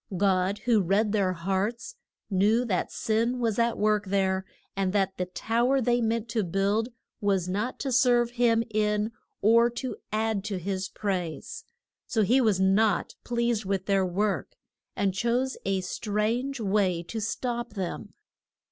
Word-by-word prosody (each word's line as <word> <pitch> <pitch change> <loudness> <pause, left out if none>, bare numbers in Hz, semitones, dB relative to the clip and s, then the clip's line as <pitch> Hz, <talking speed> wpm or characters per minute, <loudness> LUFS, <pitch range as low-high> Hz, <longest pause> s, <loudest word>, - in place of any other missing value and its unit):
God, 190 0 +2
who 230 -4 +4
read 200 +4 +2
their 195 -3 +1
hearts, 195 - -2 0.4
knew 210 +6 +3
that 190 -6 -1
sin 230 +3 0
was 230 -3 0
at 235 0 +2
work 210 -1 +1
there, 190 -1 +1 0.3
and 195 -1 0
that 195 -2 +1
the 180 - -2
tow 235 +7 0
er 275 - +3
they 240 -1 +2
meant 225 0 0
to 220 -1 0
build 200 +6 0 0.3
was 195 -3 +1
not 205 +7 -2
to 270 - -2
serve 245 -1 +3
him 235 -2 +2
in, 210 0 +1 0.3
or 230 +3 +5
to 240 +2 -5 0.2
add 215 -2 0
to 200 -3 -2
his 190 +1 -3
praise. 180 -6 -4 0.4
So 220 -3 +1
he 250 +7 +4
was 215 -6 +2
not 195 +2 +2
pleased 235 -3 0
with 190 -1 -1
their 195 -1 +2
work, 195 +3 -1 0.4
and 200 -2 0
chose 240 +6 0
a 195 -1 0
strange 220 +8 -2
way 195 -5 +1
to 220 +7 -5
stop 240 +1 -3
them. 190 -4 -5
210 Hz, 155 wpm, -27 LUFS, 195-235 Hz, 0.4 s, or